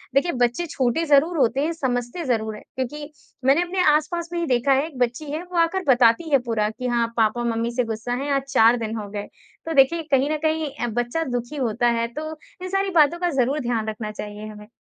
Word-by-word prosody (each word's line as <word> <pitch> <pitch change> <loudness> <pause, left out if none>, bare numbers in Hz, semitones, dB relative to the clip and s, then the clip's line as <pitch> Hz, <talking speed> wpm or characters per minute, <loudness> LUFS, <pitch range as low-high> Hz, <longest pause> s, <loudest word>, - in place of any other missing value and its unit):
देखिए 340 +5 +3
बच्चे 245 +9 0
छोटे 260 +5 0
ज़रूर 310 +3 +3
होते 260 0 +2
हैं, 315 +3 0
समझते 250 +2 -2
ज़रूर 220 -4 -1
हैं - - -12
क्योंकि 295 +4 -5 0.3
मैंने 275 +5 +5
अपने 365 +1 -1
आस-पास 335 +2 -2
में 345 - -1
ही 340 - 0
देखा 250 +1 +2
है, 275 +3 +2
एक 295 - -12
बच्ची 245 +5 0
है 315 +3 -3
वो 350 - -3
आकर 355 +3 +1
बताती 245 +5 +4
है 275 - +5
पूरा 215 -2 +1
कि 250 +3 -5
हाँ, 235 -1 +1
पापा 225 +2 +2
मम्मी 230 +1 -1
से 250 - +2
गुस्सा 230 +1 -4
है 285 - -2
आज 275 - +1
4 230 -1 +5
दिन 225 -1 -4
हो 210 -2 -5
गए। 205 0 -5 0.4
तो 325 - -2
देखिए 315 +4 +4
कहीं 275 +2 +3
न 310 - 0
कहीं 315 -1 0 0.2
अ, - - -2
बच्चा 240 +8 -1
दुखी 245 +4 -3
होता 240 -3 0
है, 230 - 0
तो 305 +6 -6 0.3
इन 370 - -5
सारी 390 +1 0
बातों 305 +3 +4
का 355 0 +1
ज़रूर 270 +5 +2
ध्यान 235 -4 -2
रखना 215 0 -5
चाहिए 210 0 -7
हमें। 210 -1 -11
255 Hz, 230 wpm, -23 LUFS, 230-315 Hz, 0.4 s, मैंने